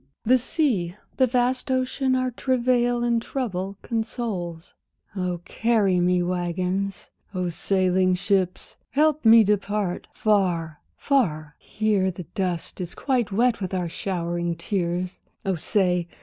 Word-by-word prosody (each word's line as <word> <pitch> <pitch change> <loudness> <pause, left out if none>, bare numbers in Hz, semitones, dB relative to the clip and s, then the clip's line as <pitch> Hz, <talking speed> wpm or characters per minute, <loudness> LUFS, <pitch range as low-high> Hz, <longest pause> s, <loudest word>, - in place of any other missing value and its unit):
The 255 +3 +4
sea, 230 - 0 0.2
the 260 - +4
vast 250 +1 0
ocean 260 0 +1
our 255 0 0
travail 245 -1 +1
and 235 -1 +2
trouble 200 -7 -3
consoles! 220 -8 -4 0.4
Oh, 180 -2 -2
carry 215 -6 +2
me, 180 0 +2
waggons, 180 +2 -2 0.2
oh, 180 -1 -1
sailing 185 +1 +2
ships, 190 -1 -1
help 305 +1 +2
me 225 0 +8
depart! 205 -2 -1
Far, 175 -7 0 0.2
far, 155 - 0
here 210 -3 0
the 180 0 -6
dust 185 -1 -3
is 175 - -6
quite 250 -6 0
wet 230 +2 +2
with 190 0 -2
our 180 -2 -1
showering 175 -1 -2
tears, 180 0 -2 0.2
Oh, 195 - +1
say! 180 -1 +1
195 Hz, 125 wpm, -24 LUFS, 180-240 Hz, 0.4 s, me